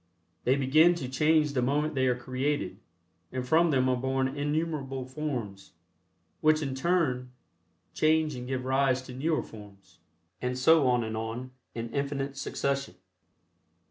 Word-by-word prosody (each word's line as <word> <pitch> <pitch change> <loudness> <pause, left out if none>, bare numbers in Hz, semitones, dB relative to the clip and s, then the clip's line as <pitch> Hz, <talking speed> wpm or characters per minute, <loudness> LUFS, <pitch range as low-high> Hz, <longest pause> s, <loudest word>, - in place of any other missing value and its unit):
They 130 - +4
begin 155 +6 +5
to 135 -7 -4
change 150 +3 +2
the 130 - +1
moment 145 +5 +1
they 130 -2 +1
are 125 - +2
created, 130 +4 -2 0.5
and 130 -1 -4
from 165 +4 +4
them 130 -3 +2
are 130 - +2
born 130 +1 0
innumerable 145 -1 -2
forms, 125 -8 -5 0.7
which 155 0 +3
in 135 -2 -2
turn 130 -4 0 0.6
change 155 -1 +2
and 125 -1 -6
give 130 -1 -3
rise 130 -1 +2
to 130 - -10
newer 155 +5 0
forms, 100 -4 -14 0.4
and 125 0 -2
so 150 +2 +5
on 125 -1 +2
and 110 0 -4
on, 115 +3 -4 0.2
in 115 0 -5
infinite 140 -1 -2
succession. 140 -5 -2
135 Hz, 145 wpm, -29 LUFS, 125-150 Hz, 0.7 s, begin